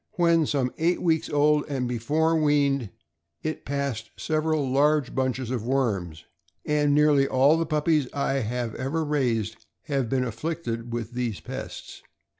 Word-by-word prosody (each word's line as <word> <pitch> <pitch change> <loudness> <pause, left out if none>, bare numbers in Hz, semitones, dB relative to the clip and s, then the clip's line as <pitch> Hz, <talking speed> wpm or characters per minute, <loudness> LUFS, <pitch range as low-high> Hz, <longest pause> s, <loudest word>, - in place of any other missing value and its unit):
When 170 -3 +3
some 130 -3 0
eight 170 +3 +2
weeks 160 -2 +1
old, 150 0 +3
and 130 -3 -1
before 150 +8 +1
weaned, 140 -6 +2 0.5
it 155 0 -4
passed 140 -5 -3
several 155 -2 0
large 145 +1 +2
bunches 130 -2 -1
of 120 -4 -2
worms; 100 - -1 0.4
and 150 -1 +2
nearly 145 -2 +4
all 135 +4 +4
the 165 -1 -1
puppies 155 -2 +1
I 140 -1 0
have 120 -1 -3
ever 150 +5 -2
raised 120 -7 -1 0.2
have 135 -6 -1
been 130 0 +1
afflicted 120 -2 -4
with 115 -1 -4
these 120 -4 -3
pests. - - -8
140 Hz, 145 wpm, -26 LUFS, 125-150 Hz, 0.5 s, nearly